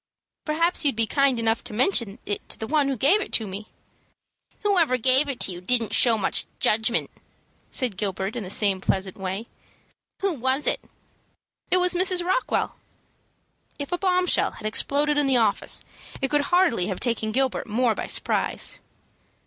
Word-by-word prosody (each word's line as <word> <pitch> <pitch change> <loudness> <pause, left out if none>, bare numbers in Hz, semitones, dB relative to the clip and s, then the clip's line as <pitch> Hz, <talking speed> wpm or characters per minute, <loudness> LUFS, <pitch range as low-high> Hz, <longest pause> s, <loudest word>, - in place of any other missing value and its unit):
"Perhaps 330 +3 0
you'd 280 -4 +1
be 225 0 +1
kind 275 +1 +1
enough 225 0 0
to 235 - -9
mention 235 - +1
it 205 - -4
to - - -3
the 220 - -5
one 290 +2 +1
that 270 -2 -2
gave 325 - +3
it - - -6
to 225 - +1
me." 200 +2 -7 1.0
"Whoever 345 -11 +2
gave 260 +4 +3
it 260 -3 -5
to - - +2
you 175 0 -8
didn't 230 +3 +1
show 235 -3 +5
much 200 - 0
judgment," 220 +2 +1 0.6
said 245 -8 0
Gilbert, 195 +1 -3
in 240 - -3
the 185 - -7
same 195 -1 +1
pleasant 190 -1 -1
way. 190 +3 -5 0.8
"Who 390 -2 +1
was 265 +1 -1
it?" - - +1 0.9
"It 365 - +3
was 360 0 +3
Mrs. 360 0 +2
Rockwell." 375 +8 -1 1.0
If 285 -1 -6
a 355 - 0
bombshell 365 -1 +2
had 215 - -11
exploded 290 +7 +1
in 290 - +1
the 265 -2 +3
office, 220 -4 +1 0.3
it 270 - -2
could 295 -1 +2
hardly 350 - +2
have 190 - -4
taken 230 -3 -2
Gilbert 260 +2 0
more 230 +2 +1
by - - -5
surprise. - - 0
250 Hz, 175 wpm, -24 LUFS, 215-300 Hz, 1.0 s, show